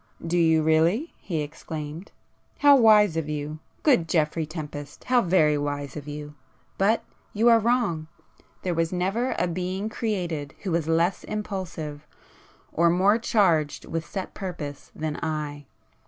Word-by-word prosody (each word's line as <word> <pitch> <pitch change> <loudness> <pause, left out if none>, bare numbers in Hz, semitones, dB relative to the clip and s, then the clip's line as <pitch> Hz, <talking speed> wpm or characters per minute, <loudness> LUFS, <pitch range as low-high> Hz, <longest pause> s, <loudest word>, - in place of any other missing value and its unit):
"Do 165 +1 -1
you 160 -1 +4
really!" 165 - +2
he 160 -5 -2
exclaimed—"How 160 - -1
wise 210 -7 +6
of 160 -2 -2
you!—good 155 - -1
Geoffrey 155 -1 +1
Tempest, 150 -2 -7
how 250 -1 +3
very 155 -6 +3
wise 145 -1 -3
of 150 -1 -7
you! 150 0 -7 0.5
But 210 +4 +3 0.3
you 225 +3 +4
are 230 -1 +7
wrong. 220 -9 +1 0.6
There 180 - 0 0.2
never 195 +7 0
was - - -2
a 180 - +1
being 185 +4 -3
created 175 - -3
who 190 - -2
was 165 -2 0
less 165 +3 +1
impulsive, 170 -8 -5 0.7
or 170 +1 +4
more 195 +6 +4
charged 170 -10 +2
with 165 0 -4
set 190 -2 -5
purpose 165 -7 -6
than 155 -1 -3
I. 150 -3 -4
165 Hz, 140 wpm, -25 LUFS, 150-200 Hz, 0.7 s, are